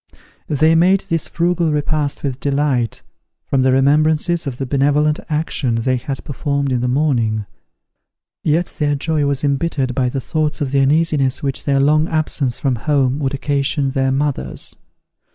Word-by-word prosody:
They 155 +2 +3
made 180 +4 +4
this 165 -2 0
frugal 170 -1 0
repast 150 -1 -1
with 135 -2 -3
delight, 140 -5 0 0.4
from 135 - +1
the 130 0 +3
remembrances 155 +5 +2
of 125 -3 -4
the 135 - -3
benevolent 145 +3 +2
action 150 -5 -1
they 125 +3 0
had 135 +2 -5
performed 140 -1 -2
in 125 -1 0
the 125 - 0
morning: 120 -6 +1 1.0
yet 165 +3 0
their 145 -1 +1
joy 150 0 0
was 140 0 -1
embittered 140 -2 0
by 125 0 0
the 135 - -3
thoughts 155 +4 -2
of 140 -4 -2
the 140 - +2
uneasiness 140 -1 +2
which 135 -2 -2
their 140 -1 +2
long 155 +3 +3
absence 150 -6 -1
from 130 -4 0
home 135 +1 +1
would 140 -1 -1
occasion 140 0 -1
their 135 -1 0
mothers. 140 +1 -2
140 Hz, 160 wpm, -18 LUFS, 135-155 Hz, 1.0 s, made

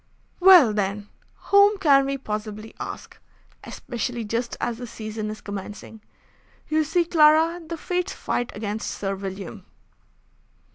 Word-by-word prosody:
"Well, 355 - +8
then, 205 0 -2 0.4
whom 400 +1 +6
can 275 -6 +4
we 275 0 -2
possibly 215 -2 -6
ask? - - -8 0.4
Especially 240 0 -5
just 230 +3 -3
as 235 -1 -3
the 245 - -6
season 215 -1 -6
is 215 0 -7
commencing. 205 +2 -8 0.7
You 310 0 +2
see, 335 +3 +1
Clara, 325 +1 +4
the 330 +1 -6
fates 360 +3 -2
fight 245 - -3
against 210 +1 -4
Sir 195 -1 -3
William." 195 -1 -7
235 Hz, 130 wpm, -24 LUFS, 210-315 Hz, 0.7 s, Well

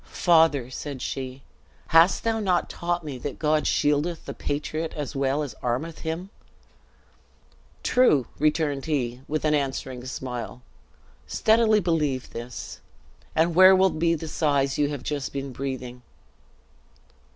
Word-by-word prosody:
"Father," 160 -7 +3
said 140 0 -6
she, 130 +1 -5 0.5
"hast 165 +3 +5
thou 225 -1 0
not 185 -4 0
taught 175 0 -2
me 140 -4 -6
that 140 +2 -5
God 155 0 +1
shieldeth 150 +3 +1
the - - -5
patriot 155 +3 -3
as 150 0 -5
well 135 +2 0
as 140 - -6
armeth 130 +7 -2
him!" 170 +4 -4 1.5
"True!" 200 - +4
returned 150 -2 +1
he, 125 -5 -1
with 155 +1 -2
an 155 - +3
answering 135 -3 -2
smile; 125 -1 -6 0.6
"steadily 220 - +3
believe 150 -7 -1
this, 120 +1 -7 0.6
and 165 +2 +3
where 185 +2 +8
will 190 0 +4
be 165 +1 +1
the 160 0 -6
sighs 140 -3 +1
you 145 -1 +2
have 145 -4 -5
just 145 -3 -3
been 140 -1 -4
breathing!" 125 -2 -5
150 Hz, 135 wpm, -25 LUFS, 135-165 Hz, 1.5 s, where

